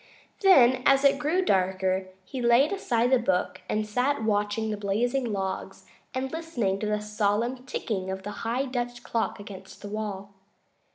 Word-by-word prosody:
Then, 260 - +6
as 275 +1 +4
it 275 0 +5
grew 335 +6 +1
darker, 190 - +1 0.2
he 255 +6 -5
laid 240 +7 +4
aside 245 -10 +1
the 260 - +5
book 190 -6 -1
and 215 0 0
sat 250 +4 0
watching 210 +1 0
the - - -1
blazing 230 +5 -1
logs 190 -2 -4 0.3
and 265 +1 -2
listening 245 -13 -2
to 215 - -2
the 210 0 0
solemn 210 +4 -1
ticking 190 -7 -3
of 190 0 -4
the 205 - -5
high 240 +4 -1
Dutch 245 -2 -4
clock 225 -2 -2
against 195 -1 -11
the 205 - -6
wall. 205 -2 -5
225 Hz, 165 wpm, -27 LUFS, 200-255 Hz, 0.3 s, Then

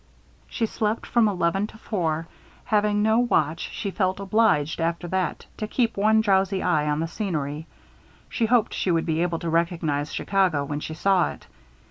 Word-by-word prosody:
She 230 - -1
slept 215 0 -2
from 235 -2 +3
eleven 195 +1 0
to 220 - -14
four. 165 -7 -2 0.4
Having 210 -2 +2
no 220 +1 +3
watch, 165 -10 +1
she 200 - -4
felt 185 -1 0
obliged, 195 -7 +2
after 170 +1 -1
that, 185 0 -2
to 215 - -3
keep 230 +1 0
one 215 +2 +3
drowsy 195 -2 +1
eye 155 -4 +1
on 150 +1 0
the 165 - -1
scenery. 160 -5 -3 0.6
She 230 - -1
hoped 230 -2 +2
she - - -1
should 165 -2 +1
be 160 0 0
able 175 -1 0
to 170 - -4
recognize 165 -3 0
Chicago 185 -8 +1
when 145 +1 -3
she 155 +1 -6
saw 190 +1 +2
it. - - -10
185 Hz, 175 wpm, -24 LUFS, 165-210 Hz, 0.6 s, from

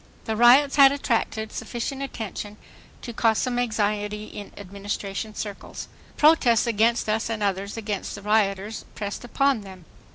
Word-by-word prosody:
The 220 - -2
riots 255 +5 +6
had 275 -1 +8
attracted 225 -5 -1
sufficient 240 +4 -4
attention 215 -5 -6 0.5
to 235 - -6
cause 225 -1 +2
some 245 -1 0
anxiety 210 -2 -1
in 205 -1 -9
Administration 200 +2 -5
circles. 205 -2 -6 0.3
Protests 290 -8 +5
against 230 +1 +2
us 220 +1 0
and 220 -2 -2
others 200 +1 -2
against 210 -3 -4
the 200 - -10
rioters 210 0 0
pressed 205 +1 -5
upon 270 0 +1
them. 190 -3 -12
220 Hz, 140 wpm, -24 LUFS, 205-240 Hz, 0.5 s, had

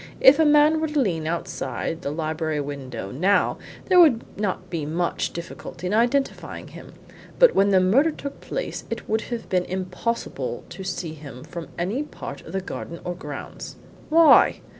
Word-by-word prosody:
If 275 +3 +7
a 320 - +5
man 300 +1 +5
were 315 - +1
to 300 -1 0
lean 165 - 0
outside 165 0 -3
the - - -3
library 155 0 -2
window 130 -8 -5
now 190 +9 +2 0.3
there 365 -2 +5
would 285 -10 +6
not 190 -2 -2
be 165 -3 -2
much 165 +4 -1
difficulty 170 +1 -8
in 180 - -1
identifying 245 +5 0
him, - - -12 0.4
but - - +7
when 200 +1 +4
the 190 -1 +5
murder 230 - +4
took 280 -2 -7
place - - -4
it 230 -1 -5
would 220 +1 +1
have 235 -2 -4
been 180 -1 +1
impossible 185 +5 -3
to 190 - -8
see 180 -3 -4
him 140 -5 -10
from 170 -2 -7
any 195 +10 -1
part 300 - -7
of - - -11
the 190 - -1
garden 170 -2 -7
or 180 - -3
grounds." 175 - -8 0.3
"Why?" 325 0 +6
185 Hz, 175 wpm, -24 LUFS, 165-270 Hz, 0.4 s, If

